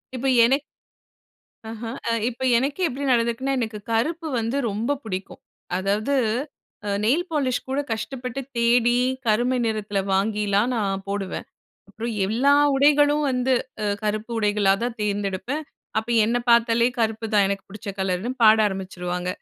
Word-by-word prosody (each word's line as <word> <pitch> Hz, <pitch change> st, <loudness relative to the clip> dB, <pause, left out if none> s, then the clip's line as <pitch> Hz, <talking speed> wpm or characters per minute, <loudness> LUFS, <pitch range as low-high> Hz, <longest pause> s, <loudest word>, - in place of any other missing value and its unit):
இப்ப 255 Hz, +2 st, -2 dB, 0.2 s
எனக் 270 Hz, +4 st, +2 dB, 1.1 s
ஆஹா. 225 Hz, +1 st, -6 dB, 0.2 s
அ -, -, +2 dB, 0.2 s
இப்ப 250 Hz, +1 st, -11 dB, 0.2 s
எனக்கே 280 Hz, +9 st, 0 dB
எப்படி 270 Hz, +3 st, -5 dB
நடந்துருக்குனா, 235 Hz, +3 st, +1 dB
எனக்கு 220 Hz, -3 st, -3 dB
கருப்பு 320 Hz, +9 st, 0 dB
வந்து 230 Hz, +4 st, -1 dB
ரொம்ப 225 Hz, +8 st, -1 dB
புடிக்கும். 190 Hz, -3 st, -6 dB, 0.4 s
அதாவது, 205 Hz, +8 st, 0 dB, 0.7 s
அ -, -, -2 dB
நெயில் 285 Hz, +11 st, +2 dB
பாலிஷ் 275 Hz, -5 st, 0 dB
கூட 270 Hz, +2 st, 0 dB
கஷ்டப்பட்டு 250 Hz, +3 st, -4 dB, 0.2 s
தேடி, 240 Hz, +1 st, +3 dB, 0.3 s
கருமை 240 Hz, +4 st, +2 dB
நிறத்துல 210 Hz, -3 st, -1 dB
வாங்கிலாம் 205 Hz, +3 st, +1 dB
நான் 195 Hz, -3 st, -1 dB
போடுவேன். 200 Hz, -1 st, -3 dB, 0.4 s
அப்புறம் 225 Hz, +3 st, -5 dB
எல்லா 250 Hz, +8 st, +3 dB, 0.2 s
உடைகளும் 290 Hz, +1 st, +4 dB
வந்து, 255 Hz, 0 st, +1 dB, 0.3 s
அ 210 Hz, -, 0 dB, 0.2 s
கருப்பு 215 Hz, +2 st, -2 dB
உடைகளா 205 Hz, -2 st, +3 dB
தான் 240 Hz, -1 st, -3 dB
தேர்ந்தெடுப்பேன். 205 Hz, +7 st, -2 dB, 0.3 s
அப்ப 220 Hz, +1 st, -4 dB, 0.2 s
என்னை 240 Hz, +2 st, +1 dB
பார்த்தாலே 235 Hz, 0 st, +4 dB
கருப்பு 225 Hz, 0 st, 0 dB
தான் 205 Hz, -1 st, +5 dB
எனக்கு 195 Hz, 0 st, -3 dB
புடிச்ச 210 Hz, +2 st, -9 dB
கலருன்னு 190 Hz, +5 st, -1 dB
பாட 215 Hz, 0 st, +8 dB
ஆரம்பிச்சுருவாங்க. 180 Hz, -2 st, -4 dB
225 Hz, 135 wpm, -23 LUFS, 205-255 Hz, 1.1 s, பாட